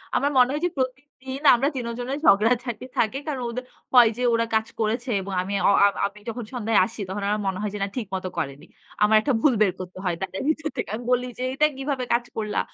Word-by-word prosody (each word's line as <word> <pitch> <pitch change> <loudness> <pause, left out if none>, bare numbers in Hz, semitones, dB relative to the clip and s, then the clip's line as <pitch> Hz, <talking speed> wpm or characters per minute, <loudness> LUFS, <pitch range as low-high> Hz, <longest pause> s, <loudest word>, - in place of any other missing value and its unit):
আমার 285 - +2
মনে 250 0 +6
হয় 300 - -2
যে - - +2
প্রতিদিন 260 +1 -4
আমরা 270 +4 +1
৩ 245 -2 -3
জনের 265 +4 -3
ঝগড়াঝাটি 235 +1 +3
থাকে। 230 +4 +1
কারণ 270 -4 -2
ওদের 250 +2 -5 0.3
হয় 240 -3 +8
যে, 250 - -2
ওরা 230 0 +2
কাজ 220 0 +1
করেছে 235 +4 -1
এবং 195 0 -6
আমি 195 +2 -4 0.2
অ - - +6
আ - - +7 0.2
আমি 205 +1 -14
যখন 240 +1 -5
সন্ধ্যায় 225 -2 +2
আসি 225 0 -8
তখন 200 +1 -4
আমার 210 0 0
মনে 190 -1 -2
হয় 210 -2 -2
যে - - -4
না - - 0
ঠিক 220 -6 -3
মত 185 - -4
করেনি। 140 +1 -4 0.4
আমার 215 +1 +5
একটা 275 +3 0
ভুল 285 -4 +4
বের 195 -3 +5
করতে 185 0 -8
হয়। 175 -2 +1
তাদের 190 0 -4
ভিতর 315 0 -1
থেকে - - -3
আমি 240 - -7
বলি 250 0 +2
যে 255 - -4
এইটা 300 +3 +3
কিভাবে 270 -1 -2
কাজ 240 0 +1
করলা? 210 -1 -1
235 Hz, 235 wpm, -24 LUFS, 210-260 Hz, 0.4 s, হয়